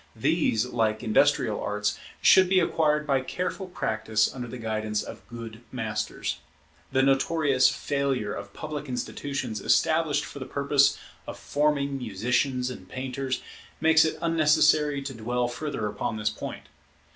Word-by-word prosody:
These, 110 +1 +1
like 110 -3 0
industrial 110 -2 +2
arts, 105 0 -1 0.3
should 185 -1 +7
be 190 0 +5
acquired 150 -3 +1
by 135 -3 +2
careful 180 +7 -4
practice 110 - 0
under 125 -2 -6
the 125 - -7
guidance 110 -2 -2
of - - -10
good 115 -1 -9
masters. 110 -4 -3 0.5
The 130 - +3
notorious 135 -1 +3
failure 135 -6 -1
of 100 0 -7
public 150 +2 -6
institutions 125 -2 -4
established 155 -3 +2
for 140 +1 -9
the 130 - -5
purpose 140 0 +3 0.3
of - - -6
forming 140 -2 0
musicians 125 +3 0
and 95 -7 -10
painters, 130 0 -3 0.4
makes 160 +1 +5
it 160 - -1
unnecessary 150 -3 +3
to 135 -1 -5
dwell 120 +2 -1
further 125 -2 -4
upon 105 +1 -3
this 105 0 0
point. 110 - -7
130 Hz, 140 wpm, -27 LUFS, 110-150 Hz, 0.5 s, should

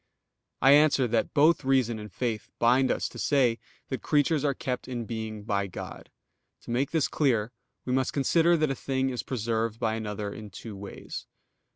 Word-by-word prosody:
I 135 - +7
answer 145 -3 +5
that, 115 0 +1
Both 150 +2 +4
reason 130 -4 +2
and 105 -1 -9
faith 110 +1 -3
bind 125 +3 +4
us - - 0
to - - -10
say 125 -5 +2 0.3
that 130 -5 -3
creatures 150 0 +2
are 140 -2 +1
kept 125 -2 -4
in 120 -3 -4
being 110 -2 -5
by 100 -1 -1
God. 90 - -8 0.5
To - - -8
make 130 +3 +1
this 160 -4 +1
clear, 120 -6 +1 0.3
we 125 - -1
must 130 0 +1
consider 165 +5 +3
that 155 -3 +1
a - - +1
thing 130 0 -1
is 125 - -3
preserved 115 -2 -2
by 110 -2 0
another 105 -2 -4
in 105 -1 -9
two 105 +2 -9
ways. 100 0 -8
125 Hz, 185 wpm, -28 LUFS, 110-135 Hz, 0.5 s, I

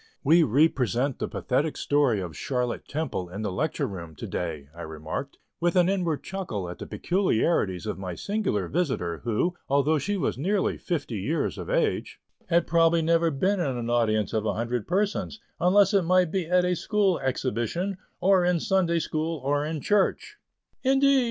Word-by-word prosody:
"We 160 +4 +6
represent 130 - +2
the - - -1
pathetic 145 +4 -1
story 140 -8 +2
of 85 -4 -6
'Charlotte 125 - -2
Temple' 145 - -3
in 100 +4 -6
the 105 - -2
Lecture 150 +11 -1
Room 85 -5 -7
to - - -7
day," 80 -5 -4
I 85 - -8
remarked, 80 - -6 0.2
with 175 +1 +1
an 180 0 +4
inward 175 -6 -1
chuckle 175 - -4
at 90 - -8
the - - -7
peculiarities 165 - 0
of - - -4
my 90 -2 -5
singular 200 - -1
visitor, 130 - -1
who, 120 +10 +1 0.2
although 140 +3 +3
she 205 +8 -1
was 140 -6 -1
nearly 195 +6 +1
fifty 145 - -3
years 145 - -1
of - - -6
age, - - 0 0.3
had 170 -1 +3
probably 165 0 +3
never 165 +1 +3
been 185 +7 0
in 135 -7 -1
an 120 0 -3
audience 110 -3 +1
of 110 -1 0
a 105 -2 -1
hundred 120 0 -2
persons, 205 +3 -1 0.2
unless 195 +4 +4
it 200 - +5
might 180 -1 +3
be 185 -4 -1
at 180 +1 +3
a 180 0 +1
school 200 0 +1
exhibition, 135 - -2 0.2
or 185 0 +4
in 175 -1 +2
Sunday 175 -2 +1
school, 160 0 -2
or 145 +1 +1
in 155 0 -3
church. 205 +3 +1 0.4
"Indeed! 270 +1 +4
155 Hz, 175 wpm, -26 LUFS, 115-180 Hz, 0.4 s, We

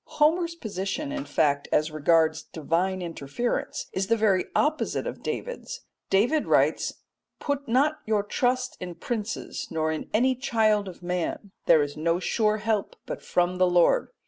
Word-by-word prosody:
Homer's 335 +3 +3
position, 220 - -4
in 290 -1 -4
fact, 145 -2 +1
as 155 +1 +2
regards 160 +1 +3
divine 180 +4 -1
interference 165 - -3
is 190 0 -1
the 230 +2 +3
very 200 -4 +3
opposite 305 +1 +1
of - - -5
David's. - - -5 0.3
David 245 +11 +2
writes, - - +2 0.4
"Put 285 -1 -2
not 285 +6 +2
your 215 -2 +2
trust 250 +4 0
in 180 -1 -6
princes 225 +1 -4
nor 160 -1 0
in 155 - -5
any 255 +5 +3
child 220 -5 +1
of 180 -1 -10
man; 180 +3 -3 0.2
there 160 -3 +6
is 145 0 -5
no 165 +2 +1
sure 215 +3 +1
help 215 -1 -1
but - - -5
from 180 +1 0
the 185 - +5
Lord." 175 - +3
200 Hz, 155 wpm, -26 LUFS, 170-250 Hz, 0.4 s, there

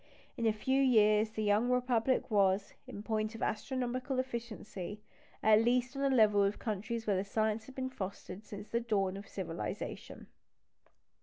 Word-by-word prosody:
In 235 -3 0
a - - +5
few 260 +6 +1
years 215 -4 +4
the 215 0 -4
young 210 +4 +2
Republic 250 -1 +1
was, 200 0 +2
in 205 - -7
point 215 0 -1
of 225 - -5
astronomical 255 +3 -2
efficiency, 225 -6 -5 0.4
at 220 0 +6
least 250 +2 +1
on 275 - -3
a 275 - +3
level 215 -5 +5
with 200 +1 +1
countries 225 +2 -3
where 200 -3 +2
the 190 - 0
science 215 +2 -1
had 265 - -12
been 260 0 -3
fostered 200 -2 -6
since 210 0 -9
the 235 - +1
dawn 200 -5 0
of 200 +1 -8
civilisation. 165 - -5
220 Hz, 165 wpm, -33 LUFS, 205-245 Hz, 0.4 s, at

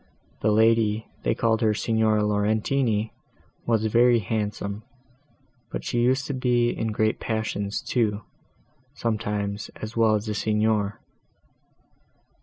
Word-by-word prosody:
The 105 - +2
lady—they 110 0 +2
called 110 -1 +1
her 110 -2 +2
Signora 110 -1 +1
Laurentini, 110 +2 +1 0.6
was 110 -2 +2
very 120 +2 +4
handsome, 105 -1 -3 0.9
but - - -4
she 120 - -1
used 130 +3 +2
to 145 - -3
be 120 -2 +2
in 110 - -3
great 110 0 0
passions, 110 -2 -2
too, 110 -4 0 0.7
sometimes, 105 -2 -2
as 110 +1 -7
well 110 -2 +4
as 105 +1 -2
the 105 - -2
Signor. 105 -1 0
110 Hz, 115 wpm, -25 LUFS, 105-115 Hz, 0.9 s, very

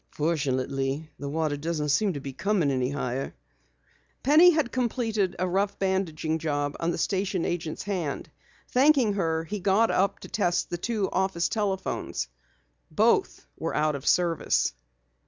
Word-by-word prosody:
"Fortunately, 140 -1 -1
the 140 - -4
water 155 0 0
doesn't 150 0 -2
seem 195 +7 +2
to 145 - -4
be 135 -1 -7
coming 140 -8 +1
higher." 135 -2 -3 0.9
Penny 310 +6 +7
had 310 -7 +1
completed 225 -6 0
a 185 - 0
rough 195 +3 0
bandaging 170 -5 -1
job 145 -2 -1
on 165 - 0
the 170 - -1
station 190 -2 0
agent's 165 -3 -3
hand. 180 -8 -3 0.4
Thanking 260 -4 +4
her, 165 -4 0
he 205 +5 -5
got 200 +4 +3
up 195 +1 +1
to - - -8
test 175 -5 0
the 175 - -3
two 215 -1 -1
office 190 -2 0
telephones. 190 - -2 0.6
Both - - +2
were - - -2
out 155 0 +2
of 135 - -7
service. 170 - +2
175 Hz, 145 wpm, -27 LUFS, 150-200 Hz, 0.9 s, Penny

